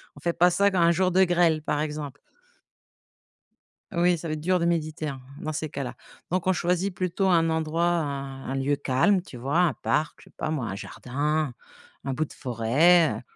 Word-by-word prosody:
On -, -, -12 dB
ne -, -, -20 dB
fait 170 Hz, -, +1 dB
pas 175 Hz, +2 st, +5 dB
ça 200 Hz, +3 st, +3 dB
quand 190 Hz, -, -1 dB
il -, -, +4 dB
y -, -, +5 dB
a -, -, +5 dB
un 170 Hz, -, +5 dB
jour 185 Hz, +1 st, +2 dB
de 190 Hz, +2 st, +5 dB
grêle, 170 Hz, -3 st, +2 dB
par 150 Hz, 0 st, -1 dB
exemple. 150 Hz, -2 st, -4 dB, 1.8 s
Oui, 175 Hz, 0 st, +2 dB
ça 165 Hz, -, -6 dB
va 155 Hz, -, -2 dB
être 155 Hz, -, -5 dB
dur 180 Hz, +2 st, +2 dB
de 170 Hz, -, 0 dB
méditer, 155 Hz, -2 st, -1 dB
hein, 135 Hz, -3 st, -6 dB, 0.2 s
dans 155 Hz, 0 st, -4 dB
ces 155 Hz, +1 st, -3 dB
cas-là. 135 Hz, -3 st, -5 dB, 0.4 s
Donc 185 Hz, 0 st, 0 dB
on 185 Hz, -, +4 dB
choisit 180 Hz, +2 st, 0 dB
plutôt 185 Hz, +2 st, 0 dB
un 165 Hz, -2 st, +3 dB
endroit 160 Hz, +1 st, -1 dB
un 140 Hz, -5 st, -2 dB
un 135 Hz, -, -2 dB
lieu 135 Hz, +2 st, +1 dB
calme, 140 Hz, +9 st, +2 dB
tu 155 Hz, -8 st, -11 dB
vois? 140 Hz, +8 st, 0 dB
Un 175 Hz, -3 st, +3 dB
parc, 150 Hz, 0 st, -1 dB
je -, -, -17 dB
sais -, -, -20 dB
pas -, -, -3 dB
moi, 150 Hz, -6 st, -2 dB
un 95 Hz, -, -4 dB
jardin, 145 Hz, +6 st, -2 dB, 0.5 s
un 135 Hz, -, -2 dB
bout 155 Hz, +4 st, -1 dB
de -, -, -14 dB
forêt, 140 Hz, +8 st, +3 dB
heu, -, -, -12 dB
155 Hz, 230 wpm, -26 LUFS, 145-175 Hz, 1.8 s, pas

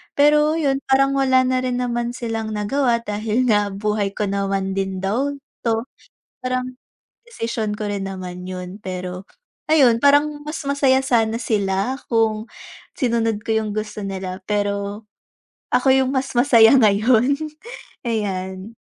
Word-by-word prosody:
Pero 300 Hz, +2 st, +4 dB
yun, 280 Hz, -4 st, +1 dB
parang 275 Hz, +1 st, +4 dB
wala 260 Hz, -1 st, +4 dB
na 255 Hz, 0 st, +1 dB
rin 250 Hz, -1 st, -1 dB
naman 240 Hz, -1 st, -2 dB
silang 225 Hz, -3 st, -4 dB
nagawa 235 Hz, +3 st, +1 dB
dahil 215 Hz, +3 st, -1 dB
nga 205 Hz, -1 st, +3 dB
buhay 205 Hz, 0 st, -1 dB
ko -, -, -1 dB
naman 195 Hz, -1 st, -1 dB
din 190 Hz, -1 st, -2 dB
daw 245 Hz, +9 st, 0 dB, 0.3 s
to, 225 Hz, -1 st, +1 dB, 0.6 s
parang 255 Hz, 0 st, -2 dB, 0.5 s
desisyon 230 Hz, -, -3 dB
ko 210 Hz, 0 st, -4 dB
rin 200 Hz, -1 st, -3 dB
naman 180 Hz, -2 st, -7 dB
yun. 185 Hz, 0 st, -6 dB
Pero, 185 Hz, 0 st, -5 dB, 0.5 s
ayun, 260 Hz, -7 st, +5 dB
parang 290 Hz, +1 st, +3 dB
mas 300 Hz, +2 st, -5 dB
masaya 275 Hz, -2 st, +3 dB
sana 230 Hz, -4 st, +1 dB
sila 200 Hz, +1 st, 0 dB
kung 220 Hz, -1 st, +1 dB, 0.5 s
sinunod 230 Hz, -4 st, 0 dB
ko 225 Hz, -, -6 dB
yung 215 Hz, -, -4 dB
gusto 215 Hz, 0 st, -4 dB
nila, 190 Hz, -1 st, -5 dB
pero, 205 Hz, +1 st, -2 dB, 0.7 s
ako 265 Hz, -1 st, +4 dB
yung 265 Hz, -1 st, +2 dB
mas 270 Hz, 0 st, -2 dB
masaya 240 Hz, -1 st, +6 dB
ngayon, 230 Hz, +3 st, +4 dB, 0.7 s
ayan. 195 Hz, -2 st, -3 dB
225 Hz, 135 wpm, -21 LUFS, 200-255 Hz, 0.7 s, masaya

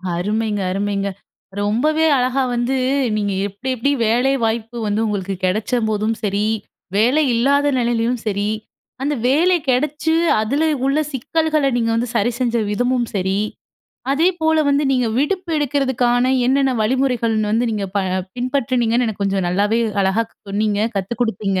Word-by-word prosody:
அருமைங்க, 210 Hz, +3 st, -1 dB
அருமைங்க. 200 Hz, +1 st, -1 dB, 0.5 s
ரொம்பவே 295 Hz, +10 st, +1 dB
அழகா 255 Hz, +1 st, +1 dB
வந்து 240 Hz, +2 st, 0 dB, 0.4 s
நீங்க 205 Hz, -1 st, -1 dB
எப்டி 205 Hz, +6 st, -7 dB
எப்டி 255 Hz, +4 st, 0 dB, 0.2 s
வேலை 245 Hz, +4 st, +2 dB
வாய்ப்பு 225 Hz, +1 st, -2 dB
வந்து 210 Hz, +2 st, 0 dB
உங்களுக்கு 200 Hz, -2 st, -2 dB
கிடைச்ச 210 Hz, +7 st, -1 dB
போதும் 215 Hz, +1 st, 0 dB
சரி, 205 Hz, 0 st, 0 dB, 0.5 s
வேலை 250 Hz, +9 st, +3 dB
இல்லாத 280 Hz, +5 st, +2 dB
நிலையிலயும் 235 Hz, 0 st, 0 dB
சரி, 205 Hz, 0 st, -1 dB, 0.5 s
அந்த 285 Hz, +2 st, 0 dB
வேலை 340 Hz, +7 st, +3 dB
கிடைச்சு 300 Hz, +5 st, +1 dB, 0.3 s
அதில 275 Hz, +8 st, 0 dB, 0.2 s
உள்ள 275 Hz, +3 st, +2 dB
சிக்கல்கள, 310 Hz, +3 st, 0 dB
நீங்க 230 Hz, -1 st, +1 dB
வந்து 235 Hz, +1 st, -1 dB
சரி 240 Hz, -, +2 dB
செஞ்ச 240 Hz, -2 st, +1 dB
விதமும் 245 Hz, +2 st, 0 dB
சரி, 190 Hz, +1 st, 0 dB, 0.7 s
அதேபோல 320 Hz, 0 st, +2 dB
வந்து 285 Hz, +1 st, +2 dB
நீங்க 250 Hz, -2 st, +1 dB
விடுப்பு 360 Hz, +5 st, -1 dB
எடுக்கிறதுக்கான 260 Hz, -3 st, +1 dB
என்னென்ன 270 Hz, +1 st, +3 dB
வழிமுறைகள்னு 230 Hz, -3 st, +1 dB
வந்து 235 Hz, +2 st, +1 dB
நீங்க 210 Hz, -2 st, -2 dB
ப -, -, +4 dB, 0.4 s
பின்பற்றினீங்கன்னு 245 Hz, -2 st, 0 dB
எனக்கு 215 Hz, -2 st, -4 dB
கொஞ்சம் 195 Hz, -2 st, 0 dB
நல்லாவே 205 Hz, +5 st, +1 dB, 0.2 s
அழகா 195 Hz, +4 st, +1 dB, 0.3 s
சொன்னீங்க, 205 Hz, 0 st, 0 dB, 0.2 s
கத்து 195 Hz, +4 st, -2 dB
குடுப்பீங்க. 195 Hz, -4 st, -1 dB
235 Hz, 135 wpm, -19 LUFS, 210-270 Hz, 0.7 s, ப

